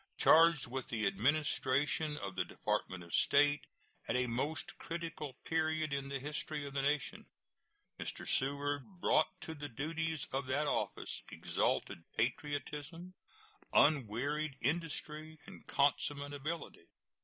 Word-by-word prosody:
Charged 165 Hz, -3 st, +6 dB
with 130 Hz, +1 st, -4 dB
the 110 Hz, -2 st, 0 dB
administration 145 Hz, +6 st, +2 dB
of 100 Hz, -6 st, -5 dB
the 90 Hz, -, +1 dB
Department 90 Hz, 0 st, -2 dB
of 85 Hz, -, -12 dB
State 145 Hz, 0 st, +4 dB, 0.5 s
at -, -, 0 dB
a 125 Hz, 0 st, +3 dB
most 130 Hz, +7 st, -2 dB
critical 165 Hz, -4 st, -4 dB
period 160 Hz, -2 st, +1 dB
in 140 Hz, 0 st, -2 dB
the 140 Hz, -, -1 dB
history 150 Hz, +1 st, -3 dB
of 140 Hz, -, -7 dB
the 140 Hz, -, +1 dB
nation, 145 Hz, 0 st, 0 dB, 0.7 s
Mr. -, -, -5 dB
Seward 145 Hz, +6 st, -1 dB
brought -, -, +4 dB
to 160 Hz, -, -5 dB
the 145 Hz, -1 st, -6 dB
duties 160 Hz, +4 st, -2 dB
of 135 Hz, -1 st, -1 dB
that 140 Hz, +3 st, +1 dB
office -, -, -1 dB
exalted -, -, 0 dB, 0.2 s
patriotism, 150 Hz, +6 st, -2 dB, 0.6 s
unwearied 145 Hz, +2 st, +3 dB
industry, 155 Hz, 0 st, -2 dB
and -, -, -12 dB
consummate 145 Hz, 0 st, +1 dB
ability. 145 Hz, -, -5 dB
145 Hz, 125 wpm, -35 LUFS, 135-155 Hz, 0.7 s, Charged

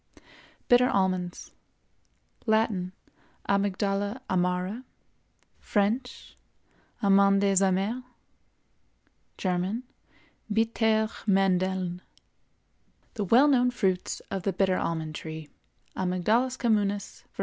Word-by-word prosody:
BITTER 245 Hz, 0 st, +5 dB
ALMONDS. 185 Hz, -2 st, -1 dB, 1.0 s
Latin—Amygdala 200 Hz, 0 st, -1 dB
amara; 180 Hz, +5 st, -1 dB, 0.8 s
French—Amandes 200 Hz, -3 st, 0 dB
amères; 195 Hz, +6 st, 0 dB, 1.3 s
German—Bittere 220 Hz, +2 st, -2 dB
Mandeln. 185 Hz, -2 st, +1 dB, 1.1 s
The 210 Hz, -4 st, -3 dB
well 245 Hz, +9 st, +5 dB
known 250 Hz, -3 st, +4 dB
fruits 190 Hz, -7 st, -1 dB
of 195 Hz, -, -2 dB
the 195 Hz, +1 st, -1 dB
bitter 190 Hz, 0 st, +1 dB
almond 160 Hz, -2 st, -3 dB
tree 155 Hz, 0 st, -7 dB, 0.5 s
(Amygdalus 215 Hz, +8 st, 0 dB
communis, 205 Hz, -4 st, -1 dB
var. -, -, -25 dB
195 Hz, 70 wpm, -27 LUFS, 185-220 Hz, 1.3 s, BITTER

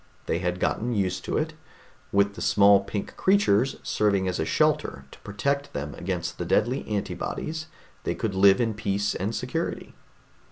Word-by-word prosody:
They 85 Hz, -, 0 dB
had 90 Hz, 0 st, -2 dB
gotten 120 Hz, +5 st, 0 dB
used 95 Hz, -2 st, -1 dB
to -, -, -1 dB
it; 160 Hz, +1 st, -1 dB, 0.6 s
with 100 Hz, 0 st, +3 dB
the -, -, -9 dB
small 100 Hz, -1 st, +6 dB
pink 100 Hz, +1 st, -5 dB
creatures 135 Hz, -, +3 dB
serving 100 Hz, -3 st, +1 dB
as 90 Hz, -, -1 dB
a -, -, 0 dB
shelter 70 Hz, -, +1 dB
to -, -, -14 dB
protect 140 Hz, +8 st, -2 dB
them 70 Hz, +1 st, -4 dB
against 90 Hz, -1 st, -4 dB
the -, -, -2 dB
deadly 125 Hz, +5 st, +1 dB
antibodies, 155 Hz, +9 st, -3 dB, 0.4 s
they -, -, -1 dB
could 110 Hz, -3 st, -2 dB
live 95 Hz, +3 st, +6 dB
in 115 Hz, -2 st, +1 dB
peace 100 Hz, -1 st, -1 dB
and 105 Hz, +4 st, -2 dB
security. -, -, -3 dB
100 Hz, 165 wpm, -26 LUFS, 95-115 Hz, 0.6 s, small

